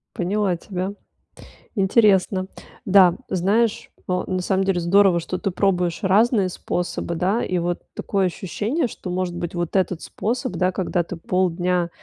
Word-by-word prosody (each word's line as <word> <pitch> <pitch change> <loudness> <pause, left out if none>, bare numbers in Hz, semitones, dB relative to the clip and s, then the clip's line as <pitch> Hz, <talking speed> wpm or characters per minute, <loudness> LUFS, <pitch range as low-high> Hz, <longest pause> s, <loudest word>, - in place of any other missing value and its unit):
Поняла 190 0 0
тебя. 185 +2 -4 0.8
Интересно. 195 -2 +3 0.4
Да, 185 -3 +6
знаешь, 215 +5 +1 0.2
ну, 180 0 0
на 185 -1 -1
самом 190 +1 0
деле 190 -2 +1
здорово, 180 +1 +4
что 180 +2 -4
ты 195 - -1
пробуешь 180 0 0
разные 205 +1 +3
способы, 175 -1 -3
да. 190 +7 0
И 185 - -1
вот 175 0 -1 0.2
такое 195 -2 0
ощущение, 210 - -2
что, 185 - -8
может 180 -1 -2
быть, 175 0 -5
вот 175 +1 -3
этот 185 -3 0
способ, 245 +4 -3
да, 185 0 +1
когда 180 -1 -1
ты 175 - -7
полдня, 180 0 0
185 Hz, 150 wpm, -22 LUFS, 175-200 Hz, 0.8 s, Да